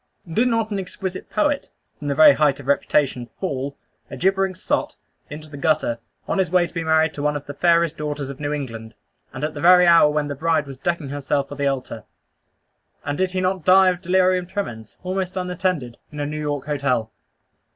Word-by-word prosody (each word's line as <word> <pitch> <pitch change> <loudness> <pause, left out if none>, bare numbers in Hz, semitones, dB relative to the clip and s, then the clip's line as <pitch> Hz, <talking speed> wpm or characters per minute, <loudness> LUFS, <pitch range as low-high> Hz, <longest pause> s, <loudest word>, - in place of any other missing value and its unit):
Did 220 +10 +1
not 225 -2 0
an 200 - -1
exquisite 190 0 -6
poet, 295 -2 0 0.3
from 145 - -6
the 140 - 0
very 155 -1 +8
height 145 -1 +2
of 145 - -10
reputation, 135 -3 +1
fall, 140 -6 -3 0.3
a 135 - -7
gibbering 190 +4 +1
sot, - - -2 0.3
into 155 +1 -8
the 145 -1 -10
gutter, 140 -5 +1 0.3
on - - 0
his 185 -4 +1
way 180 0 +3
to - - -11
be 165 -2 -2
married 160 0 +2
to 145 - -6
one 150 0 0
of 145 - -5
the 145 - -7
fairest 170 +1 +2
daughters 150 -2 -4
of 140 0 -8
New 145 0 -2
England, 115 -6 -5 0.4
and 130 - -7
at 150 0 -1
the 145 - -7
very 180 +1 +7
hour 170 -3 +6
when 150 0 -1
the 145 - -3
bride 160 +1 0
was 135 -2 -10
decking 170 -2 -2
herself 140 0 -1
for 145 - -7
the 140 0 0
altar; 130 -5 -3 1.0
and 145 0 -2
did 185 0 0
he 185 - 0
not 185 -1 -1
die 185 +1 +6
of 180 0 -2
delirium 185 0 +2
tremens, 120 - -6
almost 185 0 -3
unattended, 180 -9 -2
in 150 - -8
a 145 - -1
New 150 +1 -4
York 145 -2 -3
hotel? 135 -6 -1
150 Hz, 210 wpm, -22 LUFS, 140-180 Hz, 1.0 s, very